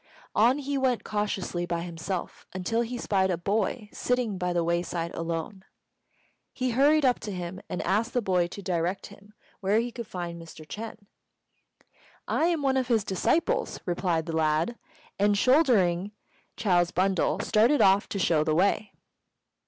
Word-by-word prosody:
On 240 +6 +4
he 285 -1 -2
went 250 -5 +1
cautiously 200 -4 -2
by 170 -1 -2
himself, 170 +1 -5
until 185 +5 -1
he 240 +1 -3
spied 190 -4 +1
a 180 - 0
boy 210 +4 -1
sitting 245 -6 -1
by 180 -1 -1
the 175 -1 +1
wayside 170 0 -1
alone. 165 +3 -4 0.9
He 255 -1 -2
hurried 285 +4 +4
up 250 -1 +3
to 210 - -6
him 180 0 -5
and - - -3
asked 210 +6 0
the 245 - +3
boy 180 -3 +2
to 200 +3 -9
direct 180 +1 -1
him 205 +1 -18 0.2
where 205 +2 +2
he 240 +1 -2
could 235 -2 -7
find 170 -3 -5
Mr. 160 -1 -11
Ch'êng. 215 +5 -8 1.2
"I - - +1
am 335 -4 +1
one 265 -1 +2
of 260 -2 0
his 230 -4 +2
disciples," 280 - 0
replied 175 -2 0
the 165 -1 -4
lad; 160 +7 +1 0.4
and, 205 0 +3
shouldering 210 - +3 0.4
Chou's 175 -6 +2
bundle, 185 -2 +1
started 230 +9 +3
off 195 +1 +4
to - - -3
shew 165 -5 +2
the 155 0 +1
way. 200 +4 +1
195 Hz, 160 wpm, -27 LUFS, 175-235 Hz, 1.2 s, On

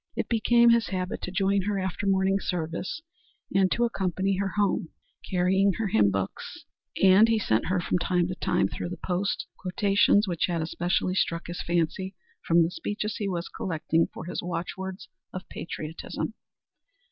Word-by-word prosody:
It - - -2
became 235 +1 +5
his 230 -1 +3
habit 185 -1 -3
to 185 - -4
join 195 +1 +2
her 205 -1 0
after 190 +1 -2
morning 195 0 +2
service 175 - -3 0.5
and 190 -1 +3
to 240 - +2
accompany 195 -3 0
her 195 -2 -1
home, 200 -5 +1 0.4
carrying 190 +1 +3
her 220 -1 -2
hymn 105 - +4
books, 95 -1 -4 0.4
and 195 +3 +7
he 225 -1 +3
sent 110 - +1
her 185 +1 +1
from 180 0 0
time 180 0 +1
to - - -2
time, - - +1
through - - -5
the 180 - -6
post, 190 +2 -1
quotations 200 +2 +3
which 175 -2 0
had 170 -3 -1
especially 175 +2 0
struck 170 -2 0
his 175 +1 -5
fancy 175 +3 -1 0.3
from 170 0 +4
the 165 - -1
speeches 210 +3 -3
he 205 -2 -2
was 175 -2 -3
collecting 165 -1 0
for - - -8
his 175 - -4
"Watchwords 185 +2 -5 0.3
of 185 - -7
Patriotism." 160 -1 -5
185 Hz, 170 wpm, -27 LUFS, 175-195 Hz, 0.5 s, and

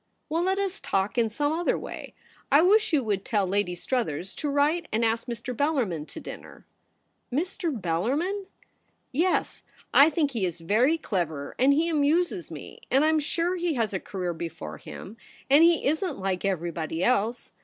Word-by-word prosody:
* - - -48
Well, 325 +2 0
let 380 +2 +1
us 395 -1 -2
talk 195 +1 -1
in 235 -2 +2
some 290 +7 0
other 340 +2 +1
way. - - -8 0.4
I 290 +3 +6
wish 425 +4 +4
you 295 -5 +3
would 200 -3 -1
tell 205 -3 +1
Lady 190 -1 0
Struthers 190 - -2
to 295 - -2
write 295 +4 +1
and 225 +2 +1
ask 230 +2 0
Mr. 240 +1 -5
Bellarmin 230 - 0
to - - -9
dinner.' - - -10 0.3
' - - -47
Mr. 340 +5 -1
Bellarmin 270 - -1 0.2
!' - - -44
' - - -46 0.2
Yes; - - 0 0.3
I 285 +3 +8
think 295 -2 0
he 230 -6 -2
is 175 -2 -2
very 230 - +2
clever, 165 - -3
and 265 +3 +5
he 315 +4 +3
amuses 335 +4 +1
me; - - -10
and 275 +3 +4
I'm 315 0 +3
sure 335 +4 -1
he 345 -3 -1
has 225 -4 0
a 190 - -1
career 180 -3 -4
before 80 - -7
him, 210 +4 -10 0.3
and 290 +4 +8
he 335 -1 +4
isn't 315 +2 0
like 190 -1 -2
everybody 170 -3 -2
else. 235 0 0
255 Hz, 185 wpm, -27 LUFS, 195-320 Hz, 0.4 s, I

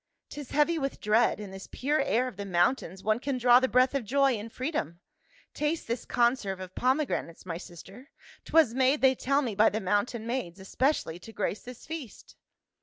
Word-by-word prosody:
" - - -55
'Tis 290 -3 -8
heavy 310 +3 +2
with 275 -1 -3
dread; 220 +3 +2
in 205 -2 -7
this 190 0 -9
pure 290 +3 0
air 255 -2 +1
of 250 - -7
the 200 - -5
mountains 185 +1 0
one 215 +2 +1
can 265 0 -2
draw 245 0 +6
the 260 - +1
breath 255 +1 +3
of 275 -3 -1
joy 275 +4 +2
and 225 0 -6
freedom. 250 - -3 0.5
Taste 300 +2 -2
this 235 +1 -3
conserve 235 -6 +1
of 185 0 -8
pomegranates, 255 - -1
my 170 -2 -5
sister; 190 - -12 0.3
'twas 315 -8 +3
made, 265 +3 +2
they 265 0 +5
tell 275 +3 0
me, 235 -5 -2
by 215 +2 +5
the 220 - -2
mountain 205 +3 -1
maids, 235 -7 -4
especially 190 - -1
to 225 - -12
grace 210 -1 -3
this 250 -1 -11
feast." 305 -7 -8
245 Hz, 195 wpm, -28 LUFS, 200-270 Hz, 0.5 s, draw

